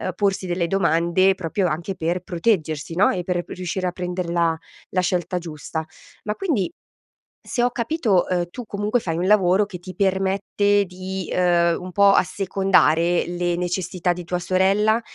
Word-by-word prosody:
porsi 195 -1 0
delle 175 -1 -1
domande 170 +1 +2
proprio 185 +2 -1
anche 170 +4 -3
per 170 +2 -1
proteggersi 165 -4 -1
no, 195 +4 +4
e 180 - -2
per 175 0 -1
riuscire 185 +1 -3
a - - -1
prenderla 175 -2 -1 0.4
la 185 - +1
scelta 180 0 -1
giusta. 160 -1 -5 0.4
Ma 210 0 -2
quindi, 255 - -1 0.8
se 240 - 0
ho 245 - +3
capito, 235 - +1
ehm, 175 -1 0
tu 245 +4 -8
comunque 210 +3 0
fai 165 -8 -3
un 175 - -1
lavoro 195 0 +4
che 195 -3 -8
ti 185 +1 -10
permette 195 +2 +1
di, 185 0 -6
ehm, 170 -2 +2
un 180 0 -8
po' 200 +2 +5
assecondare 180 -2 +2
le 175 0 -1
necessità 180 0 -1
di 175 0 -7
tua 180 +1 -2
sorella 195 +5 +2
180 Hz, 160 wpm, -22 LUFS, 175-195 Hz, 0.8 s, po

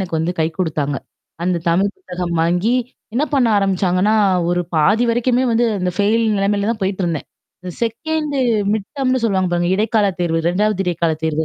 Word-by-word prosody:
எனக்கு 175 -4 -2
வந்து 165 +3 -1
கை 160 - +3
குடுத்தாங்க. 150 -5 -1 0.5
அந்த 180 0 +1
தமிழ் 190 +4 +2
புத்தகம் 180 -1 -5
வாங்கி, 180 +8 +1 0.4
என்ன 270 +5 +2
பண்ண 260 -3 +3
ஆரம்பிச்சாங்கன்னா, 195 +1 +1 0.4
ஒரு 175 0 +1
பாதி 200 +10 +3
வரைக்குமே 245 +2 +1
வந்து 230 +1 +2
அந்த 180 -1 -1
ஃபெயில் 215 +3 +2
நெலமையில 200 +1 0
தான் 220 - -9
போயிட்டுருந்தேன். 185 -5 -2 0.4
இந்த 180 - -6
2ண்டு 295 +5 -2 0.4
மிட்டம்னு 255 +4 -1
சொல்லுவாங்க 190 -4 +1
பாருங்க. 175 0 +1
இடைக்கால 215 0 +2
தேர்வு. 165 -2 +1
2வது 200 +2 +1
இடைக்கால 170 -2 0
தேர்வு. 160 0 0
195 Hz, 155 wpm, -19 LUFS, 175-225 Hz, 0.5 s, கை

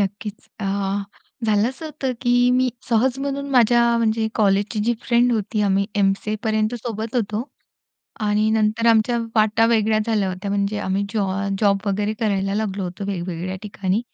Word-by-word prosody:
नक्कीच. 205 +1 -4
अ, 195 - -2 0.8
झालं 210 +1 +3
असं 265 +5 -8
होतं 275 -4 -3
की 245 0 +3
मी 255 0 +2 0.2
सहज 245 +3 +2
म्हणून 280 0 -3
माझ्या, 235 -1 +4
म्हणजे 220 -1 +1
कॉलेजची 205 +1 +1
जी 240 +1 +2
फ्रेंड 240 0 +3
होती, 215 -1 -1
आम्ही 200 0 +2
एमसीएपर्यंत 215 +3 0
सोबत 225 0 -4
होतो 220 +3 -2 0.8
आणि 210 +1 +2
नंतर 220 +1 +1
आमच्या 230 +1 +4 0.2
वाटा 220 0 +3
वेगळ्या 220 -2 +2
झाल्या 210 -4 +1
होत्या, 185 +2 -4
म्हणजे 200 +1 0
आम्ही 190 +1 -1
जॉ 210 -3 0 0.3
जॉब 200 -1 +3
वगैरे 205 +1 0
करायला 195 -2 0
लागलो 205 -2 -2
होतो 180 +3 -6
वेगवेगळ्या 180 -1 -4
ठिकाणी. 200 -1 -1
215 Hz, 155 wpm, -22 LUFS, 200-235 Hz, 0.8 s, माझ्या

